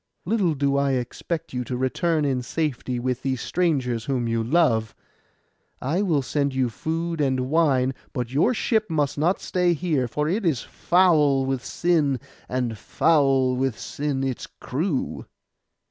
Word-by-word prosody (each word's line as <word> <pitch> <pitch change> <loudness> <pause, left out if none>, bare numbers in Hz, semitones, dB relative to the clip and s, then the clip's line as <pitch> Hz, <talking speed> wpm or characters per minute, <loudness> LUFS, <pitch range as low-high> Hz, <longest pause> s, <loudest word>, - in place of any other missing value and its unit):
Little 185 -5 +1
do 140 0 +1
I 140 -1 +2
expect 155 +6 -3
you 125 0 -2
to 125 - -3
return 150 +5 0
in 130 -3 0
safety 130 -2 -2
with 125 +1 -2
these 130 -2 -1
strangers 130 -11 0
whom 125 -4 -1
you 115 0 0
love. 115 -5 +2 0.8
I 155 +9 0
will 160 -9 +1
send 140 0 -1
you 130 -2 +1
food 165 +8 -2
and 130 -1 0
wine: 135 -5 +3 0.2
but 125 -4 -4
your 155 - +3
ship 220 -2 +1
must 150 -3 0
not 175 +5 +2
stay 180 -1 +1
here, 150 -6 0
for 150 +5 -1
it 200 +7 0
is 155 -10 +1
foul 155 -7 +3
with 135 -1 -2
sin, 155 -7 +1 0.3
and 125 -4 -2
foul 135 -5 +2
with 130 -2 -1
sin 140 -2 -3
its 130 -2 -3
crew. 145 +1 -3
140 Hz, 155 wpm, -24 LUFS, 130-165 Hz, 0.8 s, wine